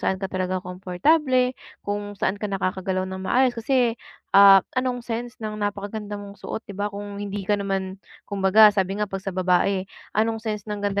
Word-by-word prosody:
saan 190 - 0
ka 195 - -3
talagang 185 0 -1
komportable, 250 - +1 0.3
kung 205 0 -3
saan 195 0 0
ka 210 - -2
nakakagalaw 185 0 -1
nang 190 0 -6
maayos. 255 +4 +3
Kasi, 240 0 +1 0.4
ah, 195 -1 +9 0.2
anong 255 -1 0
sense 240 +1 -4
ng 215 -1 -4
napakaganda 205 +1 -4
mong 200 0 -10
suot, 220 - -5
'di 200 - -8
ba, 205 +1 -1
kung 205 0 -7
hindi 200 -1 -4
ka 205 - +3
naman 195 -1 -2 0.3
kumbaga 200 +2 +6
sabi 195 0 -1
nga 210 - 0
'pag 195 -1 -5
sa 195 - -3
babae, 185 +1 +2 0.3
anong 225 +1 +1
sense 210 -3 -3
ng 210 -1 -3
ganda 200 0 0
205 Hz, 185 wpm, -24 LUFS, 190-220 Hz, 0.4 s, ah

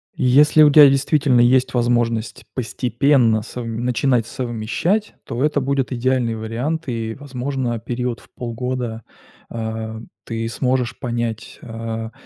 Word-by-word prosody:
Если 150 +1 +5
у 150 - +6
тебя 145 -1 +9
действительно 135 -2 +3
есть 125 +1 +3
возможность 120 -2 0
постепенно 120 -1 +2
совм 115 0 -5
начинать 125 -1 +1
совмещать, 125 - -2
то 120 +3 -3
это 150 -1 +1
будет 135 0 -1
идеальный 125 -2 0
вариант. 120 +9 -3
И, 115 -2 -3
возможно, 130 -3 -3
период 120 +1 -3
в - - -20
полгода, 120 -1 -4 0.5
а, 110 -1 -5 0.2
ты 115 0 -3
сможешь 125 0 -1
понять, 120 -3 -4
а, 115 -1 -5
120 Hz, 120 wpm, -20 LUFS, 115-130 Hz, 0.5 s, тебя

